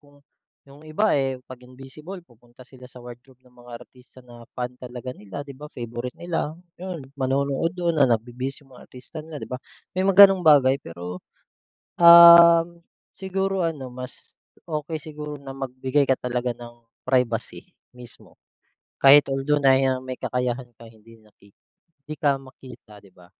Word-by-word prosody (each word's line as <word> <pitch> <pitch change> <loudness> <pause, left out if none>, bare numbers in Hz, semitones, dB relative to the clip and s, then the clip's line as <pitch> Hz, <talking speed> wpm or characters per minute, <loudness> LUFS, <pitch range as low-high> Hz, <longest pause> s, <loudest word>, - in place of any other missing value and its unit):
kung 145 -1 -24 0.4
yung 140 +1 -17
iba 205 +8 +1
eh, 135 -2 0
'pag 130 -1 -12
invisible 135 +8 -12
pupunta 120 -1 -20
sila 125 0 -16
sa 125 - -24
wardrobe 125 +1 -15
ng 125 - -24
mga 120 0 -14
artista 125 0 -21
na 120 -1 -15
fan 125 0 -4
talaga 125 0 -8
nila, 105 +4 -9
'di 140 - -11
ba 150 +3 -12
favorite 120 -1 -7
nila, 165 -2 -4 0.2
yun. 180 -7 -7
Manonood 140 +5 -2
dun 170 -3 -1
na 135 - +5
nagbibihis 125 +5 -3
yung 135 - -23
mga 125 - -16
artista 125 +4 -11
nila, 155 0 -10
'di - - -8
ba. 125 - -5 0.3
May 185 - -3
mga 195 +1 +9
ganong 195 -1 +3
bagay 140 -4 +4
pero, 90 -2 -9 0.8
um, 170 0 +8 0.3
siguro 190 0 -3
ano, 150 -7 -4
mas, 125 0 -11 0.3
okey 155 0 -5
siguro 150 -1 -8
na 140 -1 -10
magbigay 135 +1 -2
ka 130 - +3
talaga 125 -1 -3
ng 120 0 -13 0.2
privacy 125 -3 -2 0.2
mismo, 125 -1 -14 0.6
kahit 140 +2 +7
although 140 +2 -1
na 135 -1 +5
ya 130 -1 0
may 130 -1 -7
kakayahan 125 0 -3
ka, 115 0 -15
hindi 115 +1 -19
maki 100 -1 -25 0.5
hindi 155 - -7
ka 140 -3 +2
makita, 130 -5 -15
'di 100 - -20
ba? 90 -1 -21
130 Hz, 165 wpm, -23 LUFS, 125-150 Hz, 0.8 s, mga